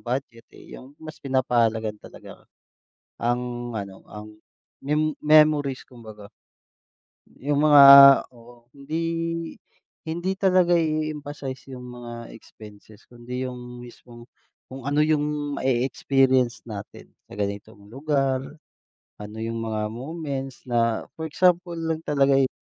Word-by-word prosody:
budget 120 -2 -5
eh, - - -15
yung 135 +3 -15
mas 155 0 -11
pinapahalagahan 115 -5 0
talaga, - - -13 0.8
ang 120 0 -2
ano, 100 -3 -7
ang, 105 0 -11 0.4
mem 150 +2 0
memories 150 -3 +3
kumbaga. 110 -4 -13 1.1
Yung 145 +1 0
mga 145 -1 +8 0.5
oo 120 0 -18
hindi 140 +3 -6 1.0
hindi 175 +4 -3
talaga 185 -2 +3
i-eemphasize 150 -4 -3
yung 125 -1 -9
mga 120 -1 -9
expenses 105 -1 -16
kundi 125 +1 -7
yung 125 -1 -8
mismong, 120 -1 -14 0.4
kung 130 -1 -10
ano 145 +1 +2
yung 150 -1 -1
mae-experience 130 -1 +1
natin 100 -2 -10 0.2
sa - - -12
ganitong 100 +1 -5
lugar, 135 -2 0 0.8
ano 105 +1 -9
yung 115 0 -4
mga 110 -1 -2
moments 135 +1 -6
na 115 -2 0
for 160 - -6
example 175 +1 +1
lang 160 -1 -3
talaga 140 -3 +2
eh, 135 -1 +2
130 Hz, 115 wpm, -24 LUFS, 115-150 Hz, 1.1 s, mga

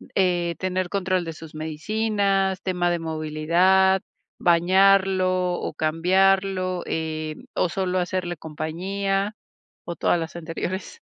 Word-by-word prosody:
eh, 175 -3 +1
tener 185 -1 -1
control 185 -2 0
de 165 - -5
sus 160 0 -12
medicinas, 195 +4 0
tema 180 -2 0
de 175 - 0
movilidad, 165 +5 +2 0.4
bañarlo 185 +1 +3
o - - -4
cambiarlo, 185 +3 +1
eh, 155 -1 -3 0.2
¿o 180 - +1
solo 185 +1 -1
hacerle 175 -1 -2
compañía? 195 +7 -2 0.5
¿O 170 - -5
todas 175 - +1
las 165 0 -5
anteriores? 175 - -5
180 Hz, 115 wpm, -24 LUFS, 165-190 Hz, 0.5 s, bañarlo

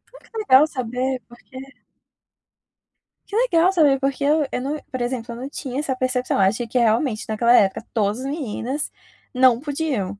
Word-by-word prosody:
Ai, - - -14
que 450 - -9
legal 305 -8 +5
saber, 255 -1 -3
porque 240 +2 -15 1.7
Que 410 - -7
legal 370 -7 +3
saber, 295 -7 +3
porque 275 +1 -1
eu 300 +1 +3
eu 250 - -2
não, 285 +3 -3
por 255 - -4
exemplo, 240 -1 -3
eu - - -8
não 265 +3 -6
tinha 270 -2 -5
essa 275 -3 -2
percepção. 255 0 -1
Eu 195 - +3
achei 225 +5 +1
que, 250 - -2
realmente, 230 0 +1
naquela 235 +2 +2
época, 200 +3 +2
todas 210 0 0
as 260 - -6
meninas 275 -1 -4 0.4
não 250 -2 +4
podiam. 275 - -3
255 Hz, 175 wpm, -22 LUFS, 235-290 Hz, 1.7 s, legal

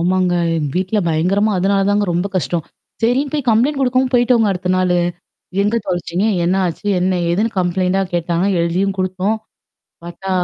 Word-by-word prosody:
ஆமாங்க. 180 +1 +1 0.4
வீட்ல 190 +4 0
பயங்கரமா 185 +7 +1
அதனால 195 +2 +2
தாங்க 205 0 +2
ரொம்ப 175 +3 0
கஷ்டம். 170 -1 -1 0.4
சரின்னு 255 +5 +1
போய் 275 -5 -2
கம்ப்ளைண்ட் 260 +6 +2
குடுக்கவும் 255 0 +1
போய்டிடோங்க 240 -3 +3
அடுத்த 180 0 -4
நாளு. 180 -1 +2 0.6
எங்க 210 +3 +1
தொலச்சீங்க? 175 +1 -2 0.2
என்ன 175 +2 +2
ஆச்சு? 175 +4 -5
என்ன 185 0 +1
எதுன்னு 210 +6 +1
கம்ப்ளைண்ட் 185 +1 0 0.2
கேட்டாங்கா 170 +2 0
எழுதியும் 180 +4 0
குடுத்தோம். 185 +3 0 0.7
பார்த்தா 180 +3 -7
190 Hz, 145 wpm, -18 LUFS, 175-220 Hz, 0.7 s, போய்டிடோங்க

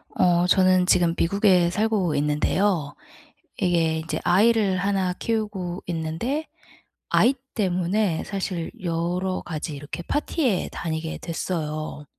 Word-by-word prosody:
어 175 0 +3
저는 185 -1 +4
지금 175 -3 +4
미국에 185 -1 +3
살고 205 -4 0
있는데요. 150 +2 +1 0.6
이게 165 -3 +1
이제 160 +1 -3
아이를 205 +1 +3
하나 190 -1 0
키우고 200 -5 -3
있는데 175 - -2 0.6
아이 255 - +4 0.2
때문에 185 -2 0
사실 185 -4 -3
여러 175 +2 -1
가지 155 -2 -5
이렇게 145 +4 -7
파티에 285 - 0
다니게 160 -1 -4
됐어요. 155 -3 -4
180 Hz, 255 characters per minute, -24 LUFS, 165-200 Hz, 0.6 s, 저는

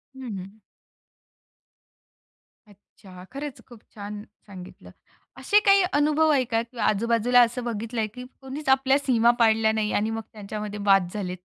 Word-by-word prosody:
हं, 245 -7 -7
हं. 195 +4 -10 2.1
अच्छा. 190 -2 -16
खरंच 280 +1 -7
खूप 240 -4 -15
छान 205 0 -7 0.2
सांगितलं. 185 -2 -12 0.5
असे 415 - +3
काही 395 -1 +6
अनुभव 305 +2 +2
आहे 275 -3 +3
का? 225 -1 0
किंवा 235 -1 -7
आजूबाजूला 235 +3 +3
असं 240 +1 0
बघितल 230 0 -5
आहे, 220 -1 0
की 250 +4 -10 0.2
कोणीच 270 +2 -6
आपल्या 265 0 +4
सीमा 240 -4 +3
पाडल्या 220 -1 +3
नाही 215 -1 -1
आणि 215 +2 0
मग 225 0 -3
त्यांच्यामध्ये 210 0 -6
वाद 195 -3 +4
झालेत. 185 -3 -4
225 Hz, 145 wpm, -25 LUFS, 210-260 Hz, 2.1 s, काही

